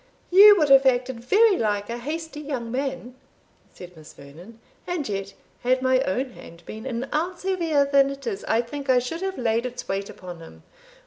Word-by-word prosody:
"You 410 +3 +9
would 305 -5 +2
have 270 0 +6
acted 250 -1 0
very 400 - +3
like 205 -2 -1
a 235 +1 -5
hasty 315 +3 -6
young 265 -6 -5
man," 260 -1 -4 0.6
said 180 -1 -13
Miss 155 -1 -14
Vernon; 170 +11 -14 0.3
"and 350 -5 -3
yet, 195 -1 -5 0.3
had 255 +1 +1
my 260 0 +3
own 255 +8 -2
hand 170 -6 -14
been 220 +4 -8
an 250 +1 -4
ounce 345 +4 -2
heavier 335 -7 +1
than 275 -1 +3
it 275 -1 -8
is, 210 -5 -4
I 225 +2 +1
think 275 +3 -8
I 255 - +5
should 250 +8 -3
have 385 0 -3
laid 230 -1 0
its 245 0 -8
weight 195 +1 -3
upon 180 -2 -10
him. 165 - -14
255 Hz, 195 wpm, -24 LUFS, 220-295 Hz, 0.6 s, You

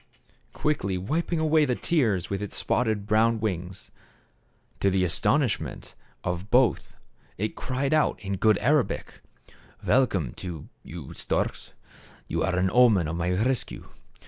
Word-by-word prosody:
Quickly 100 -11 -1
wiping 160 - -1
away 155 0 +3
the 130 -4 +1
tears 110 - +1
with 100 0 -3
its 105 - -5
spotted 110 -4 0
brown 110 +2 +3
wings, 95 -3 -4 0.9
to 100 - +3
the 95 -1 +1
astonishment 120 - 0 0.3
of 90 +3 -3
both, 125 -3 +2 0.4
it 110 +3 -2
cried 135 +3 -2
out 155 - +2
in 100 -1 -4
good 110 +1 +4
Arabic, 140 +3 0 0.3
" - - -22
Welcome 95 - +2
to 85 -5 -7
you, 80 -4 -9
storks; - - -2 0.5
you - - -2
are 95 - 0
an 90 0 +1
omen 110 -9 +5
of 80 - -3
my 85 +1 -1
rescue. 115 +8 -1
105 Hz, 140 wpm, -26 LUFS, 90-130 Hz, 0.9 s, omen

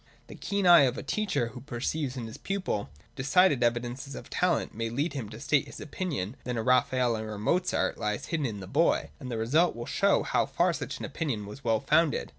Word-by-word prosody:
The - - -8
keen 200 -1 -2
eye 170 -5 +8
of 125 0 -1
a - - -5
teacher 145 - -1
who 120 +2 -10
perceives 135 +1 -3
in 120 - -4
his 110 - -9
pupil 185 - -2 0.3
decided 140 +1 +3
evidences 120 +4 -1
of - - -10
talent, 180 -1 +1
may 115 +1 -3
lead 140 +6 -1
him 125 -8 -5
to 110 +1 -9
state 145 +3 +1
his - - -10
opinion 140 - -4
that 125 -1 -3
a 110 - -1
Raphael 125 -1 +3
or 110 0 -5
a - - -6
Mozart 180 - 0
lies 105 -2 -2
hidden 155 -4 -1
in 105 -4 -6
the - - -7
boy: 90 - +1
and 130 - -7
the 115 - -3
result 145 +11 +2
will 120 0 -6
show - - +2
how - - +1
far - - +2
such - - -5
an - - -5
opinion 125 -11 -3
was 105 +7 -10
well 115 -2 +2
founded. 155 0 +2
125 Hz, 225 wpm, -28 LUFS, 115-155 Hz, 0.3 s, eye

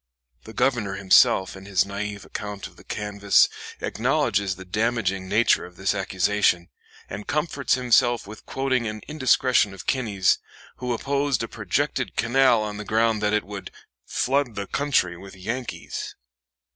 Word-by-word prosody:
The 110 - -10
Governor 110 -8 0
himself, 95 -1 +4
in 95 0 -11
his 95 -2 +2
naive 100 +1 -5
account 105 -1 -6
of - - -10
the - - -16
canvass, 100 -1 +2 0.3
acknowledges 100 -1 0
the 95 +1 -11
damaging 100 -2 -1
nature 110 +2 +3
of 90 - -11
this 95 +2 0
accusation, 95 -2 +1 0.4
and 100 +2 -7
comforts 150 -1 0
himself 120 -1 +3
with 105 +2 -12
quoting 130 -3 0
an 110 0 -5
indiscretion 130 -7 +2
of - - -10
Kinney's, 105 -8 +1 0.4
who 125 -1 -3
opposed 140 +1 0
a - - -3
projected 130 +6 -2
canal 120 -1 +3
on 105 -1 -4
the 105 - -5
ground 110 +1 +1
that 105 0 +1
"it 105 - +2
would 100 -1 -7 0.4
flood 135 -3 0
the 100 - -3
country 130 -10 +1
with 95 +2 -11
Yankees." 115 +6 -5
105 Hz, 150 wpm, -24 LUFS, 100-125 Hz, 0.4 s, himself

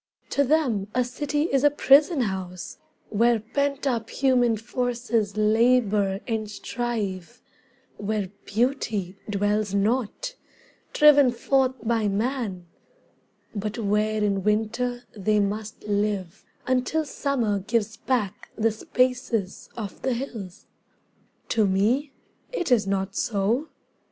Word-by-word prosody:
To 280 - +3
them 260 -9 +1
a 250 - +3
city 290 +4 -2
is 275 -4 +1
a 290 - +7
prison 290 +1 +5
house 185 -4 -4 0.3
Where 230 +2 +3
pent 280 +6 -2
up 235 -4 -1
human 245 -4 +2
forces 235 -2 -1
labour 215 -3 +3
and 220 -3 -2
strive, 210 -6 -4 0.6
Where 205 -2 -2 0.2
beauty 215 -5 -1
dwells 205 0 0
not, 240 - 0 0.6
driven 290 -3 +6
forth 260 +2 +1
by 225 -2 +1
man; 210 -3 -2 0.9
But 210 +1 -4
where 215 0 +1
in 200 -2 0
winter 235 +4 0
they 210 +1 +1
must 205 +1 -3
live 205 -3 -2 0.2
until 255 +5 +1
Summer 245 -8 -1
gives 220 +2 -1
back 225 -5 -2
the 225 0 +2
spaces 240 -3 -1
of 210 -4 -6
the 260 - 0
hills. 225 -8 -7 0.8
To 220 -3 +3
me 225 +10 +1 0.4
it 355 - -2
is 215 -5 +4
not 195 0 -1
so. 230 +7 0
225 Hz, 115 wpm, -25 LUFS, 205-255 Hz, 0.9 s, a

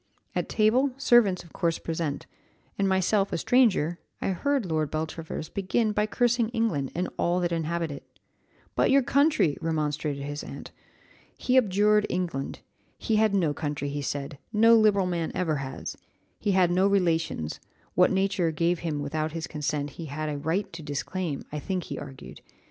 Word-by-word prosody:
At - - -2
table, 245 +5 +3
servants 240 -9 +4
of 170 - -18
course 170 -2 0
present, 160 -3 -3 0.5
and 195 -1 +1
myself 195 +2 +2
a - - 0
stranger, 185 - +3 0.2
I - - -1
heard 270 +6 0
Lord 155 -3 0
Beltravers 160 0 -4
begin 205 +5 0
by 210 0 +1
cursing 240 0 +1
England 225 - -1
and 180 +2 0
all 175 +1 +2
that 175 -1 0
inhabit 165 0 -1
it. 140 - -8 0.7
'But - - +2
your 275 0 +5
country!' 280 - +3
remonstrated 150 -2 -1
his 145 +1 -5
aunt. - - -9 0.7
He 255 - 0
abjured 210 -2 +4
England; 170 -7 -3 0.4
he 220 -2 0
had 215 -2 +3
no 165 -6 +2
country, 145 -2 -3
he 145 +1 -3
said, 140 +1 -4
no 225 +1 +6
liberal 210 -3 +4
man 170 -2 -1
ever 160 -5 0
has; 135 -1 -5 0.4
he 205 -2 +1
had 185 -2 +4
no 185 +2 +3
relations 165 - 0 0.3
what 180 - +5
nature 190 -3 +1
gave 170 +2 0
him 155 -4 -2
without 155 +2 -2
his 165 -1 -3
consent 150 -1 -3
he 165 - -8
had 155 +2 -3
a 145 - -3
right 180 +6 -1
to 165 - -7
disclaim, 150 +2 -3
I 150 - -3
think 185 +3 -2
he - - -6
argued. 135 -2 -10
170 Hz, 170 wpm, -27 LUFS, 155-205 Hz, 0.7 s, no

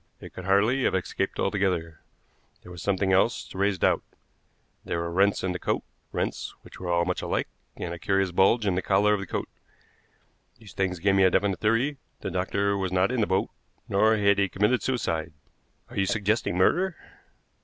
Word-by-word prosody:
It - - -11
could 90 - -8
hardly 105 +8 +3
have - - +2
escaped 95 +1 -2
altogether. 90 -5 -1 0.6
There 90 - -12
was 85 -2 -9
something 95 -1 +1
else 115 +6 +2
to - - -10
raise 100 -1 +2
doubt. - - +2 0.8
There - - -3
were 85 0 -3
rents 100 +3 +2
in 95 - 0
the 90 - -4
coat, - - -1 0.3
rents - - -3
which - - -13
were 90 - -5
all 85 0 +2
much 90 0 -2
alike, - - -1 0.3
and 85 - -4
a 85 - -7
curious 95 0 +1
bulge 95 +5 +3
in 95 - +2
the 90 - 0
collar 105 +2 +3
of 105 - 0
the 100 - -6
coat. - - -3 1.1
These 110 -3 -14
things 95 -2 -1
gave 95 +3 +2
me 95 0 +4
a 95 - +6
definite 95 -1 +1
theory. 120 +7 +1 0.2
The - - -4
doctor 100 0 0
was 95 -2 -2
not 95 +4 +2
in 125 -2 0
the 105 - +1
boat, 95 0 0 0.4
nor 110 +3 +3
had 100 -1 +3
he 100 -1 +2
committed 105 +7 +1
suicide." 85 - -2 0.6
"Are - - -9
you 95 0 +2
suggesting 105 -2 0
murder?" 175 - +2
95 Hz, 195 wpm, -26 LUFS, 90-105 Hz, 1.1 s, a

